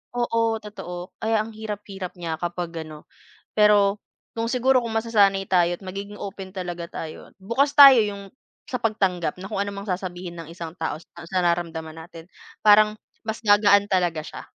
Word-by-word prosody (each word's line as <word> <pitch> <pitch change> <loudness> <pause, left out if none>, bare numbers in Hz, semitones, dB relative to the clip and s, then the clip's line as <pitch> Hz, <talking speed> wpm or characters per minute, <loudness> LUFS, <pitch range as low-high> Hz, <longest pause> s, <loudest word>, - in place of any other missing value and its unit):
oo, 230 -2 +1
totoo 180 -4 -8
kaya 220 -1 +2
ang 225 - -9
hirap-hirap 205 -4 -6
niya 165 -2 -4
kapag 175 -1 -3 0.2
ano. 150 -1 -11 0.5
Pero 205 -1 +4 0.3
kung 230 +1 -2
siguro 255 0 +3
kung 230 - -4
masasanay 200 -4 +3
tayo 175 -1 +3
at - - -21
magiging 200 +2 -7
open 195 -1 -7
talaga 175 -2 -5
tayo 160 -1 -8
at - - -29
bukas 235 +9 +1
tayo 275 -3 +11
yung 200 -2 -5 0.4
sa 250 - -3
pagtanggap 185 -7 0
na 190 - -7
kung 205 - -3
ano 200 - -3
ang 200 +1 -7
sasabihin 180 -1 -4
ng 165 -1 -8
isang 170 -1 -8
tao 160 -1 -2
sa 170 0 -14
sa 185 - 0
nararamdaman 165 -2 -1
natin 165 0 -11 0.4
parang 210 0 +6 0.3
mas 220 +1 -3
gagaan 205 -1 +5
talaga 175 -4 +1
siya. - - -8
195 Hz, 175 wpm, -24 LUFS, 175-215 Hz, 0.5 s, tayo